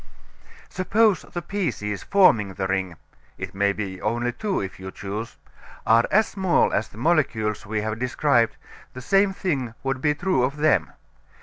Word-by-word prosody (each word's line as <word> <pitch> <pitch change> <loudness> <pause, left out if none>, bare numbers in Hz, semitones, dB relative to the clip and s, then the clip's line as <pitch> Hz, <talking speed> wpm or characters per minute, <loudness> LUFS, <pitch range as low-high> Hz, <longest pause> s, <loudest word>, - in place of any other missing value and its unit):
Suppose 205 0 +2
the 175 - -7
pieces 135 - -3
forming 115 - +3
the 95 - -2
ring 95 -2 -1 0.4
it - - -6
may 100 +1 +2
be 100 -3 -5
only 120 +1 -1
two, 195 - -2
if 95 -1 -6
you 95 0 -7
choose 105 +4 -6 0.5
are 115 +1 +5
as 215 +2 +4
small 190 -3 +2
as 105 - 0
the - - -16
molecules 115 -8 0
we 105 0 -1
have 110 +1 -3
described, 125 -1 +2 0.4
the 130 - -8
same 195 +8 +3
thing 135 -12 -2
would 135 -1 -2
be 150 0 +2
true 175 -4 +1
of 135 +4 -1
them. 125 - +2
120 Hz, 165 wpm, -24 LUFS, 105-175 Hz, 0.5 s, are